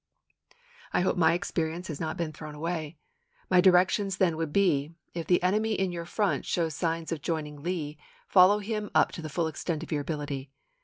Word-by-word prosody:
I - - +3
hope 185 - +1
my 165 -2 +4
experience 170 0 -2
has 155 -4 -5
not 160 -1 -3
been 165 -2 -2
thrown 155 0 -8
away. 160 0 -4 0.5
My 180 -1 +6
directions 190 +2 +4
then 180 -4 +2
would 160 -1 -3
be, 165 -5 +2 0.2
if 170 -1 -4
the 180 -1 +3
enemy 215 +4 +2
in 190 -3 0
your 170 -1 -5
front 205 +3 0
shows 165 -2 -1
signs 165 +1 -2
of 160 -3 -3
joining 150 -3 -3
Lee 155 -3 -3 0.3
follow 190 +2 +6
him 210 0 -3
up - - +4
to - - -7
the 155 - -6
full 165 +3 0
extent 160 0 -3
of 165 - -9
your 150 -2 0
ability. 145 -2 -4
165 Hz, 195 wpm, -28 LUFS, 155-185 Hz, 0.5 s, My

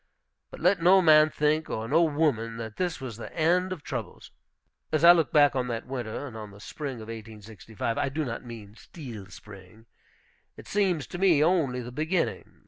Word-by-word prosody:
But - - -11
let 180 +1 +3
no 185 +3 +6
man 155 -3 +6
think, 150 +1 0
or 110 +1 -4
no 155 +7 +3
woman, 145 -8 0
that 110 -1 -7
this 180 -2 -2
was 125 -5 -7
the 115 - -8
end 180 +3 +2
of 175 -5 -6
troubles. 115 -8 -7 0.6
As 155 +1 0
I 170 - +10
look 165 -7 +2
back 145 -2 +4
on 125 -1 -1
that 115 -2 -4
winter, 125 0 -5
and 125 -5 -9
on 110 -2 -8
the 100 0 -15
spring 140 +4 -6
of 115 - -10
1865 110 0 -6
(I 140 - 0
do 155 +3 -3
not 115 -2 -5
mean 115 -4 -10
the 110 - -21
steel 120 - -10
spring), 100 +2 -14 0.7
it - - -12
seems 185 -7 0
to 175 - -8
me 175 -6 +4
only 155 -8 +1
the 120 +1 -8
beginning. 160 +7 -2
135 Hz, 200 wpm, -27 LUFS, 115-160 Hz, 0.7 s, I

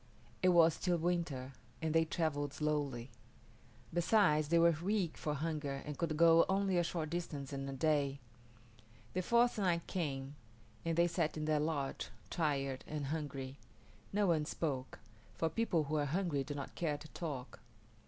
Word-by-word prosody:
It 185 - +5
was 170 -2 +6
still 175 +1 0
winter, 160 -6 -1 0.3
and 160 -1 -1
they 165 0 +4
travelled 145 -4 -1
slowly. 145 -5 -1 0.8
Besides, 175 -4 +4
they 170 +3 +3
were 170 0 +6
weak 190 -3 0
from 150 -1 -2
hunger 145 -2 -3
and 150 - -4
could 155 0 -1
go 165 0 +7
only 190 -1 +2
a - - +3
short 160 -2 -3
distance 150 -5 -4
in 135 0 -3
a - - -4
day. 140 -1 +1 1.0
The 185 - 0
fourth 235 +4 +3
night 175 -4 +1
came, 140 -6 -3 0.5
and 165 -1 -1
they 170 - +6
sat 170 -2 0
in 155 - -2
their 155 -1 +2
lodge, 145 -3 -2 0.2
tired 140 -5 0
and 150 -2 -3
hungry. 140 -3 -5 0.5
No 205 +1 +2
one 160 -4 +2
spoke, 140 -5 -3 0.4
for 165 - 0
people 170 -3 +1
who 150 +2 -1
are 145 - +1
hungry 155 -2 0
do 145 +1 -5
not 140 - -6
care 155 -4 -1
to 155 - -11
talk. 140 -7 -5
155 Hz, 165 wpm, -35 LUFS, 145-170 Hz, 1.0 s, go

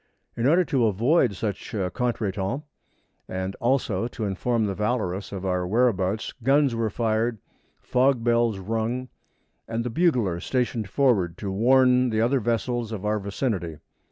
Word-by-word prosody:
In 120 +2 +1
order 175 +5 +4
to 130 -6 +2
avoid 115 - +2
such 105 +2 -4
a 95 -3 -1
contretemps, 115 0 -2 0.7
and 95 +1 -3
also 120 -5 0
to 115 -2 -5
inform 110 +4 0
the 100 - -1
Valorous 105 -3 -2
of 95 -1 -5
our 90 -1 0
whereabouts, 110 -2 +1
guns 135 +1 +3
were 115 -1 0
fired, 115 +2 0 0.5
fog 125 -1 +2
bells 115 -2 +2
rung, 115 +5 -2 0.6
and 115 +1 -2
the 125 - -3
bugler 120 - +1
stationed 115 0 -1
forward 100 - +2
to 100 - -4
warn 125 +4 +4
the 110 -1 0
other 125 +4 +2
vessels 120 0 -1
of 105 -2 -5
our 105 0 +1
vicinity. 100 - -3
115 Hz, 150 wpm, -25 LUFS, 100-125 Hz, 0.7 s, order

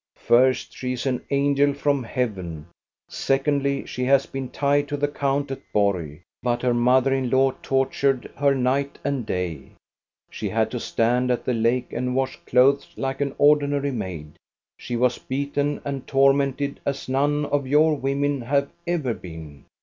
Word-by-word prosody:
First, 130 +2 +3
she 125 -1 -3
is 125 +2 -3 0.2
angel 140 0 +2
from 140 -1 +1
heaven, 95 -11 -3 0.2
— - - -69
secondly, 140 0 0
she 125 - -4
has 135 +1 +4
been 135 -2 -6
Tied 145 0 +1
to 145 - -3
the 145 +1 +1
count 140 -1 -1
at 135 - -5
Borg. 90 -6 0 0.2
But 120 0 -1
her 125 -1 +2
mother 125 +3 +3
in 130 -2 0
law 130 +1 +3
tortured 135 -1 0
her 140 -1 +2
night 135 +2 0
and 140 -6 -2
day; 85 -7 -4 0.6
she - - -4
had - - 0
to - - -3
stand 125 +2 +1
at 125 - -1
the 125 - +1
lake 120 +2 0
and 125 +1 -2
wash 135 0 -1
clothes 135 +3 +3
like 135 +1 -3
an 140 -1 -1
ordinary 145 -1 +3
maid; 90 - -6 0.4
she 120 0 -5
was 125 +1 +1
beaten 140 +2 -2
and 140 -2 -4
tormented 140 0 +2
as 140 0 -3
none 145 +3 +1
of 145 -2 -1
your 150 +3 +4
women 140 0 -1
have 140 +3 0 0.2
ever 155 -9 0
been. 80 -7 -10
135 Hz, 165 wpm, -23 LUFS, 125-140 Hz, 0.6 s, has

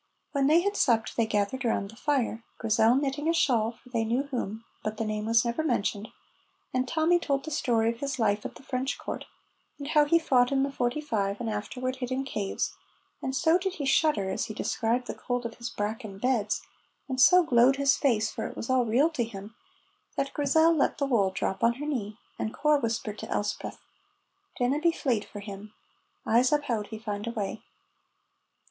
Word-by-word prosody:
When 275 -2 +2
they 320 +4 +5
had 405 +2 -1
supped 230 - +2
they 230 -2 +2
gathered 210 +5 -1
round 205 -4 0
the - - -15
fire, 245 -4 -1
Grizel 225 +1 +3
knitting 285 +3 0
a 335 - +2
shawl 235 -7 +2
for 245 +2 -20
they 230 -2 0
knew 235 +5 0
whom, 230 -5 -4 0.2
but 215 0 -3
the 225 - -1
name 215 0 -2
was 230 +1 +4
never 235 +5 0
mentioned, 220 -6 0 0.7
and 255 0 0
Tommy 330 +4 +3
told 275 -3 -1
the 315 - -5
story 230 -5 +2
of 235 - -10
his 280 -1 -3
life 210 -3 +1
at - - -6
the - - -14
French 265 +1 -2
court, - - -6 0.5
and 285 0 -6
how 300 -1 +5
he 335 +3 +4
fought 255 -6 +3
in 270 -1 +2
the 275 - -1
'45 240 -6 -1
and 230 -2 -2
afterward 255 +5 -3
hid 250 -2 -4
in 260 +1 0
caves, 210 -7 -2 0.5
and 265 0 -2
so 325 +5 +3
did 380 0 -2
he 290 - -4
shudder, 270 -9 +2
as 190 - -1
he 215 -2 -7
described 235 +3 0
the - - -4
cold 245 -1 -3
of 230 -1 -5
his 235 0 -4
bracken 210 -2 -4
beds, 220 -2 0 0.4
and 260 -2 0
so 360 +8 +7
glowed 255 -2 +5
his 280 0 +3
face, 225 -6 +1
for - - -4
it - - -10
was 235 - -3
all 255 -2 +3
real 260 +9 +3
to 275 -7 0
him, 210 -1 -8 0.6
that 275 - -1
Grizel 320 +3 +4
let 285 - +1
the 280 - 0
wool 225 -8 +2
drop 190 0 -3
on 230 0 +5
her 290 +4 -6
knee, 215 -8 -3 0.2
and 220 - -3
Corp 300 -1 +3
whispered 225 -2 -2
to - - -7
Elspeth, 205 0 -3 0.8
"Dinna 255 +3 +1
be 335 +2 +3
fleid 245 -10 -1
for 205 - -9
him; 205 +1 -9 0.5
I'se 240 +3 +4
uphaud 240 -8 0
he 220 - -7
found 210 -1 -5
a - - -1
wy." 210 -4 -4
245 Hz, 205 wpm, -28 LUFS, 220-280 Hz, 0.8 s, so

